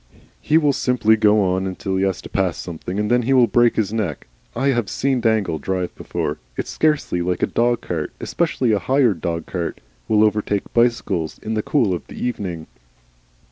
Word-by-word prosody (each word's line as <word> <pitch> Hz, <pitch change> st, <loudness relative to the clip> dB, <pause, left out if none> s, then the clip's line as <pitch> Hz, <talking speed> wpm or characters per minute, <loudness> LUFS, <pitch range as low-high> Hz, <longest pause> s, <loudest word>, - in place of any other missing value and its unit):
"He 155 Hz, -, +3 dB
will 150 Hz, -3 st, +3 dB
simply 125 Hz, -4 st, +2 dB
go 105 Hz, -1 st, +4 dB
on 95 Hz, 0 st, 0 dB
until 95 Hz, +1 st, -3 dB
he 95 Hz, -, +1 dB
has 95 Hz, -3 st, -2 dB
to -, -, -7 dB
pass 95 Hz, -3 st, 0 dB
something, 90 Hz, +3 st, -5 dB
and 105 Hz, +2 st, -1 dB
then 125 Hz, 0 st, +4 dB
he 130 Hz, +3 st, +1 dB
will 125 Hz, -2 st, +6 dB
break 120 Hz, 0 st, +3 dB
his 105 Hz, -1 st, 0 dB
neck. 100 Hz, -10 st, -2 dB, 0.3 s
I 135 Hz, +3 st, +1 dB
have 120 Hz, -6 st, 0 dB
seen 135 Hz, -2 st, 0 dB
Dangle 110 Hz, -8 st, +1 dB
drive 90 Hz, +3 st, -2 dB
before. -, -, -4 dB, 0.2 s
It's -, -, -3 dB
scarcely 150 Hz, -, +1 dB
likely 90 Hz, 0 st, 0 dB
a -, -, -20 dB
dog 120 Hz, 0 st, +1 dB
cart, 80 Hz, -3 st, -3 dB
especially 135 Hz, -8 st, 0 dB
a 105 Hz, -, +2 dB
hired 125 Hz, -6 st, +2 dB
dog 85 Hz, -1 st, -2 dB
cart, 85 Hz, -3 st, -4 dB, 0.3 s
will 105 Hz, 0 st, +4 dB
overtake 105 Hz, -1 st, 0 dB
bicycles 115 Hz, -9 st, +1 dB
in 110 Hz, -, -3 dB
the 110 Hz, -, 0 dB
cool 115 Hz, -, +1 dB
of 85 Hz, -, -5 dB
the -, -, -11 dB
evening. 90 Hz, -9 st, -3 dB
105 Hz, 195 wpm, -21 LUFS, 90-120 Hz, 0.3 s, will